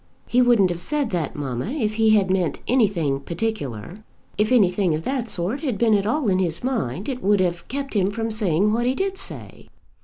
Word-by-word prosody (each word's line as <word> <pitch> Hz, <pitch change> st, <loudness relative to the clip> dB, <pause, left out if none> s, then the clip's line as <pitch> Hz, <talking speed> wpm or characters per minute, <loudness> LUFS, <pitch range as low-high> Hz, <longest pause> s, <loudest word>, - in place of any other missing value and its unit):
"He 250 Hz, -, +2 dB
wouldn't 235 Hz, -7 st, +4 dB
have 175 Hz, 0 st, -4 dB
said 290 Hz, +2 st, -1 dB
that, 170 Hz, -6 st, -2 dB
mamma, 130 Hz, -2 st, -3 dB
if 220 Hz, -8 st, -1 dB
he 220 Hz, -1 st, +5 dB
had 195 Hz, -3 st, +2 dB
meant 185 Hz, -4 st, 0 dB
anything 190 Hz, -, +1 dB
particular. 170 Hz, -, -5 dB, 0.3 s
If 210 Hz, +3 st, 0 dB
anything 190 Hz, -7 st, +3 dB
of 155 Hz, -, -5 dB
that 255 Hz, -1 st, -2 dB
sort 190 Hz, +10 st, -1 dB
had 265 Hz, -8 st, -2 dB
been 225 Hz, 0 st, +3 dB
at 200 Hz, -1 st, +2 dB
all 250 Hz, +3 st, 0 dB
in 185 Hz, -2 st, +2 dB
his 170 Hz, -1 st, -1 dB
mind, 205 Hz, -, -2 dB
it 260 Hz, -3 st, -4 dB
would 205 Hz, +1 st, +3 dB
have 175 Hz, -2 st, -1 dB
kept 275 Hz, 0 st, -4 dB
him 195 Hz, -3 st, +2 dB
from 225 Hz, +2 st, -3 dB
saying 210 Hz, -1 st, +1 dB
what 240 Hz, +2 st, 0 dB
he 255 Hz, -, +1 dB
did 390 Hz, +3 st, -1 dB
say." -, -, -9 dB
205 Hz, 210 wpm, -23 LUFS, 175-240 Hz, 0.3 s, he